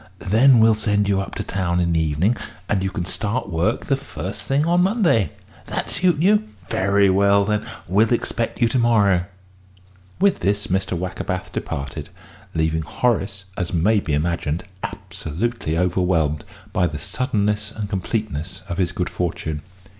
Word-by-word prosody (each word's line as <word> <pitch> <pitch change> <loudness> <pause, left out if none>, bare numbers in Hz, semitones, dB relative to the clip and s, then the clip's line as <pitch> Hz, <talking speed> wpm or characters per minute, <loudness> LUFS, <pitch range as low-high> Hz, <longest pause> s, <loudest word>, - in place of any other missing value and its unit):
Then 115 +7 +5
we'll 110 0 +6
send 105 -1 +1
you 100 -1 +2
up 95 - -7
to - - -3
town 90 -2 -1
in 85 -1 +1
the 80 - +2
evening, 80 +9 +2 0.3
and 100 -2 +1
you 95 - 0
can 95 -3 -3
start 105 +3 -2
work 85 +7 0
the 135 - +2
first 105 -7 -6
thing 135 +8 +1
on 175 +1 +3
Monday. 180 - +3 0.4
That - - -2
suit 180 -4 +3
you? 205 - +3 0.2
Very 100 +1 +3
well, 100 +1 +4
then. 105 0 -1 0.2
We'll 105 +6 +3
expect 115 -1 -1
you 120 - +4
to 130 - +1
morrow." 100 -7 +3 0.9
With 200 0 +3
this 100 +3 0
Mr. 95 -1 -1
Wackerbath 90 +1 -4
departed, 70 -2 -4 0.5
leaving 80 0 +1
Horace, 100 +2 -1
as 90 -1 -2
may 105 +6 +3
be 80 -6 -1
imagined, 80 0 -1 0.2
absolutely 80 +1 -3
overwhelmed 85 -4 +1 0.3
by 90 -5 +3
the 80 -2 -5
suddenness 105 - -1
and 105 -2 -4
completeness 95 -3 -3
of 85 -1 -4
his 90 -2 +1
good 90 -1 -2
fortune. 80 -3 -3
100 Hz, 160 wpm, -22 LUFS, 85-110 Hz, 0.9 s, we'll